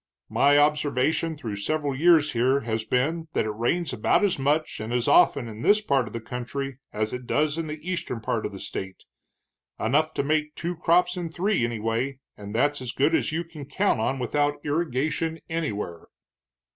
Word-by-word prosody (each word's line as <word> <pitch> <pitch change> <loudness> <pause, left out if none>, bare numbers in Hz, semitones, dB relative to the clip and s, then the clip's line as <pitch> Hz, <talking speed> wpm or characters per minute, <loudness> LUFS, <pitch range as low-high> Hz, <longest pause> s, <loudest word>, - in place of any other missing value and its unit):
My 145 +1 +4
observation 150 +2 +2
through 110 -7 -5
several 145 +7 -1
years 160 0 +5
here 130 +4 +2
has 110 -1 -2
been 155 +8 0
that - - +1
it 110 - -1
rains 120 +11 -1
about 120 - +2
as 195 -7 +2
much 150 +3 0
and 110 +2 -5
as 120 -1 0
often 125 -4 +5
in 110 0 -8
this 205 - +5
part 140 - +1
of - - -10
the 115 - -3
country 125 +3 -5
as 110 0 -2
it 125 -1 -6
does 150 0 +1
in 165 -1 -3
the 150 0 -5
eastern 170 -9 -2
part 110 - -1
of - - -10
the - - -8
state, 95 -1 -6 0.8
enough 150 +7 +2
to - - 0
make 150 +1 0
two 175 +1 -3
crops 180 +2 +2
in 175 -2 -3
three, 185 - 0
anyway, 120 +3 -1 0.2
and 105 +1 -8
that's 145 +3 +2
as 125 -1 -4
good 145 +6 +2
as - - +1
you 165 +2 -1
can 160 -4 -10
count 185 - +1
on 130 +5 0
without 145 +3 0
irrigation 155 +2 -1
anywhere." 105 - -3
145 Hz, 190 wpm, -26 LUFS, 120-160 Hz, 0.8 s, years